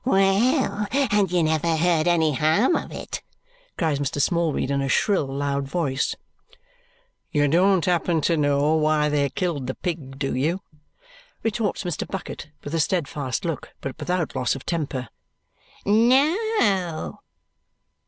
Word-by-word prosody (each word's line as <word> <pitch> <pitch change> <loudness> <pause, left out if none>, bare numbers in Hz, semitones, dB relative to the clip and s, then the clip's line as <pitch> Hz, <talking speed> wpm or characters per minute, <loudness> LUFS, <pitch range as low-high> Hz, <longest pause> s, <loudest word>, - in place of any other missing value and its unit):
"Well, 205 +1 +2
and 210 -9 +2
you 175 -2 +2
never 160 +1 +1
heard 165 -1 +2
any 160 -3 +3
harm 160 - +3
of - - -3
it!" - - -6 0.6
cries 155 -5 0
Mr. 145 0 -2
Smallweed 160 -3 +1
in 140 0 +1
a 135 - -1
shrill 190 -1 +2
loud 140 0 -2
voice. 140 -4 -1 1.2
"You 145 -1 +2
don't 180 +4 +3
happen 175 -2 +1
to 170 - +2
know 145 0 +2
why 155 -1 +2
they 145 -1 +1
killed 155 -8 -2
the 130 - -3
pig, 150 -7 -5
do 135 0 -2
you?" 155 +9 0 0.8
retorts 220 -3 -1
Mr. 175 -4 -3
Bucket 185 -5 -6
with 145 - -6
a 165 - +1
steadfast 145 - -1
look, 165 -4 -4
but 135 -2 -5
without 180 -3 -2
loss 125 - 0
of 135 - -9
temper. 140 -7 -2 0.8
"No!" 235 - +2
165 Hz, 140 wpm, -24 LUFS, 145-190 Hz, 1.2 s, any